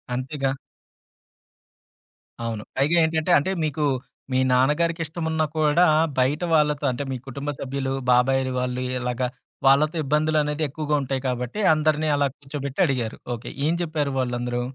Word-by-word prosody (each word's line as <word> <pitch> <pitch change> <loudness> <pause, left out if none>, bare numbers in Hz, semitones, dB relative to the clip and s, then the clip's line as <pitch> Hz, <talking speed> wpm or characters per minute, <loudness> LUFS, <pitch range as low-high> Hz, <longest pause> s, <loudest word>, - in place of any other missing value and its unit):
అంతేగా! 135 +1 -2 1.9
అవును. 110 -2 -3
పైగా 145 +5 +3
ఏంటంటే 160 -1 0
అంటే 145 +7 0
మీకు 150 0 -2 0.5
మీ 130 - +2
నాన్నగారికి 150 +6 +2
ఇష్టమున్నా 160 0 -1
కూడా 155 +3 +4 0.3
బయట 130 +5 +2
వాళ్ళతో 150 -2 +2
అంటే 125 +3 -3
మీ 130 - -2
కుటుంబ 140 +2 -5
సభ్యులు, 135 0 -3 0.2
బాబాయి 130 +1 +3
వాళ్ళు 125 0 -2 0.2
ఇలాగా 125 +1 -1 0.4
వాళ్ళతో 150 +4 +4
ఇబ్బందులనేది 150 +1 +1
ఎక్కువగా 150 +1 -1
ఉంటాయి. 135 -1 -2
కాబట్టి, 125 - -3
అందరిని 155 0 +1
అలా 145 0 +2
కూర్చోబెట్టి 140 0 -6
అడిగారు. 120 -5 -2 0.2
ఓకే. 115 - -8 0.2
ఏం 165 - +2
జెప్పారు 155 -4 -1
వాళ్ళందరూ? 120 -1 -1
140 Hz, 130 wpm, -24 LUFS, 130-155 Hz, 1.9 s, కూడా